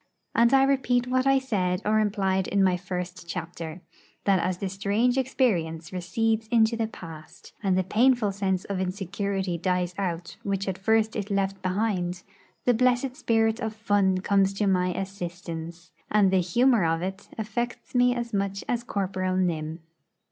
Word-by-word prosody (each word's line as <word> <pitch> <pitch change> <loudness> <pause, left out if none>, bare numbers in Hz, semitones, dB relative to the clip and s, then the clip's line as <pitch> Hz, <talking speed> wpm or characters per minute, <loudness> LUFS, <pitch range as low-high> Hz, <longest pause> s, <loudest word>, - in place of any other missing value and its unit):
And 235 +1 +4
I 270 0 +6
repeat 255 -3 +2
what 255 +1 +1
I 270 0 +5
said 190 -9 0
or 215 +1 +3
implied 195 -3 +1
in 200 -1 +2
my 185 -1 +3
first 180 0 -5
chapter, 165 0 -6 0.4
that 195 -2 +3
as 180 +1 -1
the 195 - -3
strange 200 +6 +1
experience 190 - 0
recedes 220 +5 0
into 225 0 +3
the 225 -1 -1
past, 165 -7 -11
and 190 -3 +1
the 185 - +2
painful 230 +2 +3
sense 190 -2 -1
of 200 -2 -3
insecurity 190 -1 -2
dies 180 0 0
out 175 -3 -3
which 195 -1 -2
at 190 -1 -3
first 220 +2 +2
it 205 -1 -3
left 195 -1 -1
behind, 185 -2 -1 0.4
the 245 - +5
blessed 250 +2 +2
spirit 225 -5 +1
of 220 -2 -3
fun 200 -4 +2
comes 195 0 +2
to 205 - 0
my 185 -2 +2
assistance, 175 -3 -6 0.2
and 205 -3 +4
the 190 -1 +4
'humour 235 +5 +3
of 165 +1 +1
it' 190 +2 -5
affects 230 +3 -4
me 245 0 +4
as 235 -1 -4
much 195 0 -1
as 240 -1 -1
Corporal 185 -4 -1
Nym. 165 -3 -1
195 Hz, 165 wpm, -26 LUFS, 180-225 Hz, 0.4 s, I